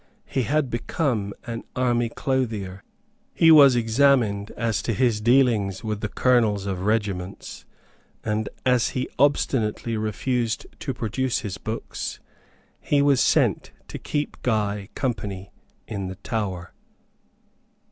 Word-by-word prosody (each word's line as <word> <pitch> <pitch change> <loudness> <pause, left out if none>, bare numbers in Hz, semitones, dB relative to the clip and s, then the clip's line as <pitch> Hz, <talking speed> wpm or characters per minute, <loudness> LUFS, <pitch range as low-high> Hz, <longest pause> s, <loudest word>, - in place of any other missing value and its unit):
He 135 - -1
had 135 +2 0
become 120 - -1
an 115 -2 -4
army 120 -2 +1
clothier. 110 -8 -2 0.5
He 165 -1 +6
was 140 -5 +8
examined 115 -3 +2
as 115 -3 0
to 115 - -1
his 120 -3 +1
dealings 115 -5 +2
with 105 -2 -3
the 110 - -1
colonels 110 -6 +2
of 95 0 -3
regiments; 100 -4 -2 0.6
and, 105 -1 -1 0.2
as 125 -2 +3
he 130 - -1
obstinately 120 -5 +1
refused 115 +2 -1
to 135 -3 -4
produce 120 +3 -1
his 105 -2 -5
books, 110 +2 -5 0.6
he 145 -1 +2
was 140 -3 +4
sent - - +2 0.2
to - - -6
keep 150 0 -3
Guy 105 -4 -1
company 100 -7 -3 0.4
in 100 -3 -4
the 95 - -6
Tower. 95 -4 -4
115 Hz, 125 wpm, -24 LUFS, 105-130 Hz, 0.6 s, was